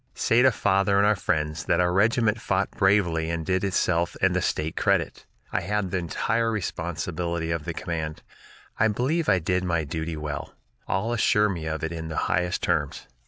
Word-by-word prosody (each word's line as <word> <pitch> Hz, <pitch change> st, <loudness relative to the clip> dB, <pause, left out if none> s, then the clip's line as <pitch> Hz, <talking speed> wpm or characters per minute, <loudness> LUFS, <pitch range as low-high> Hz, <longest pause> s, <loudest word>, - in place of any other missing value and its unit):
"Say 115 Hz, +2 st, +3 dB
to 130 Hz, +1 st, +6 dB
father 100 Hz, -2 st, +2 dB
and 100 Hz, -, +4 dB
our 105 Hz, +1 st, +4 dB
friends 75 Hz, -4 st, -1 dB
that 85 Hz, -, +2 dB
our 90 Hz, 0 st, +2 dB
regiment 110 Hz, +2 st, +2 dB
fought 95 Hz, -2 st, 0 dB
bravely 90 Hz, -5 st, +2 dB
and 85 Hz, -1 st, -3 dB
did 95 Hz, +2 st, 0 dB
itself 90 Hz, -3 st, 0 dB
and -, -, +2 dB
the -, -, +1 dB
State 80 Hz, +1 st, -1 dB
credit. -, -, 0 dB, 0.2 s
I -, -, 0 dB
had 105 Hz, -3 st, -2 dB
the 95 Hz, -, 0 dB
entire 115 Hz, +7 st, 0 dB
responsibility 85 Hz, -3 st, -3 dB
of 80 Hz, -3 st, -2 dB
the -, -, -3 dB
command. 80 Hz, -2 st, -4 dB, 0.6 s
I 110 Hz, -, +5 dB
believe 135 Hz, +10 st, 0 dB
I 95 Hz, -, +5 dB
did 90 Hz, +2 st, 0 dB
my 85 Hz, -3 st, 0 dB
duty 80 Hz, +2 st, -4 dB
well; 75 Hz, -2 st, -5 dB, 0.3 s
all 110 Hz, +5 st, -1 dB
assure 105 Hz, -2 st, +3 dB
me 85 Hz, -5 st, -4 dB
of 80 Hz, 0 st, -3 dB
it 80 Hz, -, -2 dB
in 80 Hz, -1 st, -5 dB
the 80 Hz, -, -5 dB
highest 90 Hz, +1 st, 0 dB
terms. 75 Hz, -5 st, -1 dB
90 Hz, 190 wpm, -25 LUFS, 80-105 Hz, 0.6 s, to